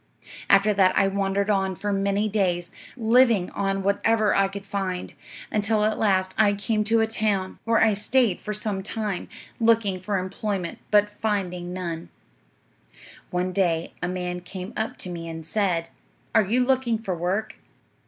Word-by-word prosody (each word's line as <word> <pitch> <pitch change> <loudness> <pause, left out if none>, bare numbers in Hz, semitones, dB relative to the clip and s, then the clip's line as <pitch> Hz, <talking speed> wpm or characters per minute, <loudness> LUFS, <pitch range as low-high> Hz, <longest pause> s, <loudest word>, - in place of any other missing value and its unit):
"'After 200 +2 +5
that 190 -2 +3
I 195 - +4
wandered 200 +1 0
on 190 -2 0
for 205 +3 -2
many 200 +2 +1
days, 180 -4 0 0.3
living 230 -4 +4
on 195 -1 -1
whatever 215 +2 +2
I 195 0 +3
could 195 0 -8
find, 190 -2 -3 0.4
until 210 0 +1
at 215 0 +1
last 190 -3 +2
I 210 -2 +5
came 210 +2 0
to 225 +1 +3
a - - +4
town, 210 -4 -1
where 230 0 +3
I 220 -1 +4
stayed 210 0 +1
for 210 - -4
some 210 -2 -3
time, 210 -1 -4 0.3
looking 225 -5 +3
for 200 +2 -1
employment 190 -1 -3
but 210 0 +5
finding 195 -4 -3
none. 170 -2 -5 1.2
"'One 180 +1 -1
day 170 -4 0
a 180 - -1
man 180 0 -3
came 185 +3 -8
up 220 +1 -3
to 185 - -6
me 165 -1 -6
and 160 -1 -7
said, 175 -2 0 0.4
"Are 220 - +6
you 245 +6 +2
looking 255 -3 +1
for 215 -4 -3
work?" 185 +6 -2
200 Hz, 165 wpm, -25 LUFS, 185-215 Hz, 1.2 s, Are